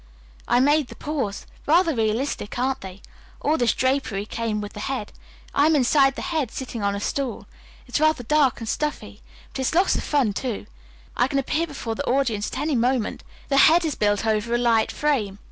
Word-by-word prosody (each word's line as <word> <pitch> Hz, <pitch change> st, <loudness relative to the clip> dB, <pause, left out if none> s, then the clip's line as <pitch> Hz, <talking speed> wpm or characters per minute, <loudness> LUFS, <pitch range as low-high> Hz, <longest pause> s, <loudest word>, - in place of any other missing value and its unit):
I 240 Hz, -, +3 dB
made 290 Hz, +1 st, +3 dB
the -, -, -11 dB
paws. 270 Hz, -10 st, -3 dB, 0.2 s
Rather 335 Hz, +2 st, +4 dB
realistic, 225 Hz, 0 st, -1 dB
aren't 260 Hz, +2 st, 0 dB
they? 190 Hz, 0 st, -10 dB, 0.4 s
All 300 Hz, -, +1 dB
this 240 Hz, -7 st, +2 dB
drapery 260 Hz, -7 st, 0 dB
came 220 Hz, -1 st, -2 dB
with 205 Hz, 0 st, -6 dB
the -, -, -8 dB
head. 245 Hz, -1 st, -3 dB, 0.4 s
I 290 Hz, +2 st, +4 dB
am 320 Hz, -, +4 dB
inside 270 Hz, 0 st, +4 dB
the -, -, -5 dB
head, 300 Hz, -7 st, 0 dB
sitting 245 Hz, -2 st, -6 dB
on 200 Hz, 0 st, 0 dB
a -, -, -3 dB
stool. 265 Hz, +4 st, -3 dB, 0.4 s
It's -, -, -1 dB
rather 310 Hz, -4 st, +2 dB
dark 285 Hz, +1 st, +2 dB
and 225 Hz, -, -6 dB
stuffy, 300 Hz, +6 st, -3 dB, 0.3 s
but -, -, -7 dB
it's 265 Hz, +4 st, 0 dB
lots 370 Hz, +3 st, +3 dB
of -, -, -2 dB
fun, 270 Hz, -8 st, +1 dB
too. 240 Hz, +1 st, -4 dB, 0.5 s
I 245 Hz, -, +2 dB
can 275 Hz, -, -2 dB
appear 310 Hz, +5 st, 0 dB
before 260 Hz, -7 st, -5 dB
the -, -, -4 dB
audience 240 Hz, -6 st, 0 dB
at -, -, -5 dB
any 295 Hz, +1 st, 0 dB
moment. 245 Hz, -1 st, 0 dB, 0.3 s
The 275 Hz, -, +2 dB
head 330 Hz, +5 st, +6 dB
is 310 Hz, -, 0 dB
built 205 Hz, -1 st, +1 dB
over 220 Hz, +2 st, +1 dB
a -, -, +3 dB
light 230 Hz, -2 st, +2 dB
frame. 235 Hz, -10 st, 0 dB
255 Hz, 200 wpm, -23 LUFS, 220-290 Hz, 0.5 s, head